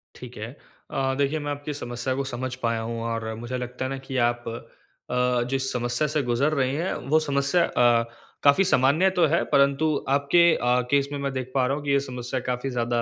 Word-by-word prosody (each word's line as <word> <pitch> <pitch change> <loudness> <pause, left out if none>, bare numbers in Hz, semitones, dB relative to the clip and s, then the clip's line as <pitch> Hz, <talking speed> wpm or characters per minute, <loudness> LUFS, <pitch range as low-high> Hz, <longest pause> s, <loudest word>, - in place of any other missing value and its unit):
ठीक 125 -1 -11
है। 110 +3 -6 0.4
अ, 135 0 0
देखिए 140 +2 0
मैं 145 -1 -4
आपकी 145 +1 -5
समस्या 120 -1 -3
को 140 - -1
समझ 130 -1 -4
पाया 115 -1 0
हूँ 115 0 -4
और 115 -1 -3
मुझे 120 +3 -5
लगता 125 +1 -5
है 135 - -3
न 135 - -7
कि 135 - -3
आप 120 0 -11 0.7
अ, 125 -1 +1
जिस 135 0 0
समस्या 120 +4 0
से 150 0 0
गुज़र 125 +5 +1
रहे 130 -3 +1
हैं 170 +5 -1 0.2
वो 155 +2 +5
समस्या 140 +3 +2
अ, 120 -1 +3 0.4
काफ़ी 145 +7 +5
सामान्य 160 +1 +3
तो 170 - +6
है 165 +3 +1
परंतु 140 +2 +3
आपके 145 +5 +4
अ, 125 +1 +2
केस 140 0 +2
में 145 - -4
मैं 140 0 -2
देख 130 -1 -4
पा 130 -2 +3
रहा 135 - 0
हूँ 150 - -7
कि 140 - 0
यह 140 - +4
समस्या 125 0 -3
काफ़ी 125 +2 -3
ज़्यादा 120 -1 -1
135 Hz, 215 wpm, -25 LUFS, 120-145 Hz, 0.7 s, तो